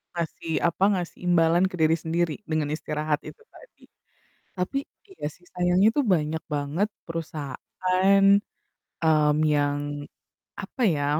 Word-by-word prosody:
ngasih 165 -1 -4
apa, 170 +3 -1
ngasih 175 -2 -5
imbalan 170 +1 +4
ke - - -5
diri 160 +1 +4
sendiri 165 0 0 0.2
dengan 155 -2 +1
istirahat 150 -1 -2
itu 450 - -16
tadi. - - -18 0.7
Tapi, 185 +9 -2 0.3
iya 385 - -8
sih 180 - -25
sayangnya 180 +3 +3
itu 290 - +3
banyak 155 +1 -2
banget 150 +8 -1 0.2
perusahaan, 185 +5 0 0.8
mmm, 150 -2 +4 0.2
yang, 145 0 -1 0.5
apa 260 - -7
ya, 145 -4 0
165 Hz, 125 wpm, -25 LUFS, 150-180 Hz, 0.8 s, imbalan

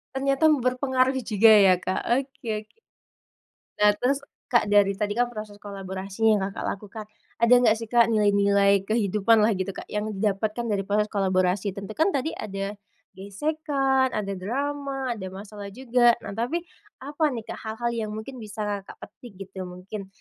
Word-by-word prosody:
Ternyata 275 +2 0
berpengaruh 260 0 +1
juga 220 +1 +5
ya 195 -3 +7
Kak, 185 +1 -2 0.2
oke 270 -3 -10 0.2
oke. 315 - -36 1.1
Nah, 210 - +7
terus, 270 +3 +1 0.3
Kak 240 - +4
dari 200 -1 +5
tadi 205 -1 -1
kan 245 - +3
proses 215 -2 -8
kolaborasinya 195 +2 -2
yang - - -3
Kakak - - -7
lakukan. 210 +2 -9 0.4
Ada 235 +2 +7
nggak 225 -3 +4
sih 225 -1 -7
Kak, 235 -1 +5
nilai-nilai 200 -2 +3
kehidupan 215 0 +3
lah 220 - +4
gitu 190 +1 -2
Kak - - -8
yang 210 +1 -2
didapatkan 215 +3 -1
dari 200 -1 0
proses 210 +1 +1
kolaborasi, 185 0 0
tentu 200 +1 -7
kan 325 +3 +2
tadi 280 +4 0
ada 200 0 -5 0.4
gesekan, 270 +4 0
ada 200 -2 -2
drama, 270 +4 -3
ada 190 -4 -7
masalah 205 +1 -9
juga. 240 -2 +3
Nah - - -6
tapi, 320 +9 -1 0.4
apa 290 +3 -2
nih 225 - -5
Kak, - - -6
hal-hal 235 +2 -2 0.2
yang - - -7
mungkin 245 +4 -7
bisa 215 -1 -6 0.2
Kakak - - -10 0.2
petik 240 -4 -14 0.2
gitu, 190 -1 -6
mungkin, 190 +3 -8
215 Hz, 165 wpm, -25 LUFS, 200-255 Hz, 1.1 s, ya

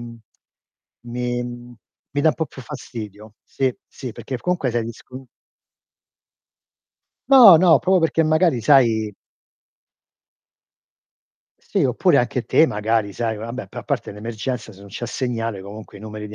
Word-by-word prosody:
mhmm, 120 -1 -9 0.9
mi 120 0 -2
mhmm, 120 0 -9 0.4
mi 145 - 0
da 160 - +5
un 155 - +1
po' 155 +6 -2
più 135 - -12
fastidio. 110 -6 -9
Sì, 130 -2 -2
sì, 125 -4 -8
perché 130 +3 -6
f - - -22
comunque 180 -8 0
sei 120 -1 -1
discon 125 +3 -10 2.0
No, 245 -10 +9
no, 170 0 +5
proprio 185 0 +2
perché 165 0 +2
magari 155 -4 +2
sai 115 -4 +3 2.5
Sì, - - -1
oppure - - +2
anche - - 0
te, - - +4
magari, 105 0 -1
sai 115 +1 -2
vabbè, 115 0 -6
però - - -7
a - - -28
parte - - -2
l'emergenza, 110 +2 -5
se 95 - -17
non 100 - -13
c'è 120 +5 -6
segnale 115 -4 -3
comunque 105 +1 -10
i - - -13
numeri 105 0 -7
di 105 - -10
120 Hz, 150 wpm, -21 LUFS, 110-135 Hz, 2.5 s, No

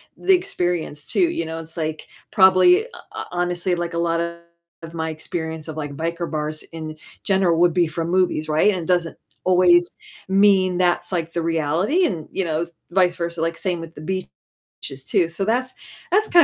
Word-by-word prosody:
the 385 - +3
experience 175 - -1
too, 350 -3 +2
you 165 - -2
know? 160 0 -5
It's, 165 0 -10
like, 155 -1 -3 0.2
probably 190 - +6
ho - - -11 0.2
ho - - -5
honestly 175 +1 0
like 170 0 -3
a - - -2
lot 170 0 +1
of 170 -1 -9
my 160 -1 -2
experience 160 0 -5
of 160 - -6
like 145 -2 -4
biker 170 +2 -3
bars 155 0 -3
in 155 -1 -6 0.3
general 190 -4 +2
would 175 -1 +4
be 175 -1 +3
from 165 +1 -3
movies, 180 -4 +1
right? 155 +7 +4
And 185 - -2
it - - -6
doesn't 175 -2 +1 0.3
always 175 -1 +4 0.4
mean 190 -2 +4
that's 180 +1 +1
like 165 -2 -2
the 170 - -1
reality 165 - +1
and, 165 - -3
you 190 - -1
know, 160 -1 0
s 170 0 -6 0.2
vice 180 -1 +3
versa, 170 -1 -3
like 165 0 -1
same 180 -3 -2
with 165 0 -10
the - - -9
beaches, 185 +3 -6 0.6
too. 170 - +2
So 190 +3 -3
that's 250 +3 0 0.4
that's 425 +4 +3
kind 345 -1 +7
170 Hz, 195 wpm, -22 LUFS, 160-185 Hz, 0.6 s, kind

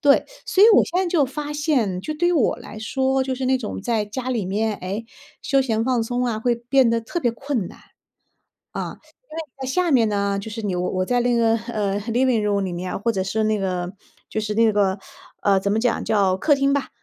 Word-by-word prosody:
对， 285 -2 +4 0.2
所 390 - +3
以 - - +9
我 - - +6
现 360 - -1
在 375 - -1
就 335 -5 +3
发 290 +3 -5
现 275 - 0
就 310 - -4
对 345 +3 +1
于 - - +2
我 300 -9 +2
来 215 - -10
说， 265 +4 0
就 260 0 -2
是 260 0 -3
那 260 0 +3
种 220 -5 -5
在 225 -1 0
家 250 +5 -5
里 230 -6 -1
面， 210 +3 0
诶， 200 +5 -5 0.4
休 275 -1 +2
闲 225 -3 0
放 250 -3 +1
松 245 +2 -1
啊 225 -3 -1
会 240 +1 +2
变 245 0 +3
得 230 - +1
特 345 +10 -4
别 240 - +2
困 235 -5 -3
难。 - - -14 0.9
啊， - - -5 0.3
因 310 - -9
为 325 - -2 0.2
在 - - -3
下 355 +4 +1
面 240 -5 +4
呢， 200 -1 0
就 200 +2 -6
是 225 +2 -5
你 195 -3 -1
我 180 0 -1
我 185 0 0
在 245 0 +1
那 245 0 +2
个， 230 -1 +3
呃 210 -3 -2
Living 235 +1 +1
room 205 -1 +1
里 185 - -3
面 180 +1 -4
或 230 - +1
者 190 - -1
是 215 +3 -1
那 215 0 +1
个， 180 -2 -2 0.4
就 - - -4
是 210 0 -3
那 225 +1 +4
个， 200 -1 +1 0.4
呃， 200 -1 +4
怎 200 +1 -1
么 220 - +1
讲， 240 0 0
叫 195 -3 +2
客 295 +9 +3
厅 275 0 +2
吧， 280 - -1
230 Hz, 285 characters per minute, -22 LUFS, 205-265 Hz, 0.9 s, 以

